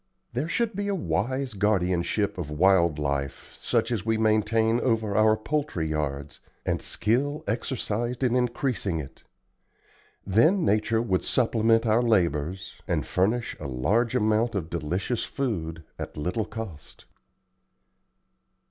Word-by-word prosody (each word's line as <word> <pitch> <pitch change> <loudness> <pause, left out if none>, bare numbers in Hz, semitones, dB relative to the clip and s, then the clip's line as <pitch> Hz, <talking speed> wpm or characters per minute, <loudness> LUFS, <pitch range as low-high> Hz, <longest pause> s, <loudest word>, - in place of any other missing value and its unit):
There 135 +7 -2
should 230 +2 0
be 205 +1 -2
a 200 - 0
wise 130 - -1
guardianship 95 -1 0
of 80 -4 -4
wild 85 0 +3
life, 70 -2 -3
such 115 - 0
as 110 -6 -1
we 110 +1 +1
maintain 110 +1 +2
over 110 -5 0
our 110 +1 +5
poultry 140 - -2
yards, 70 -3 -3 0.3
and - - 0
skill 140 +7 0
exercised 120 +2 -2
in 125 -1 +2
increasing 125 -6 0
it. 70 -4 -8 1.0
Then 155 - +4
nature 110 +2 +2
would 95 -6 0
supplement 115 -2 +2
our 110 +1 +3
labors, 90 -6 0
and - - 0
furnish 110 +6 0
a 75 - -5
large 100 - +1
amount 110 +2 +2
of 85 -4 -3
delicious 90 +8 -2
food 85 -12 -3 0.2
at - - -6
little 90 +8 -1
cost." 110 -9 -8
110 Hz, 130 wpm, -26 LUFS, 90-120 Hz, 1.0 s, our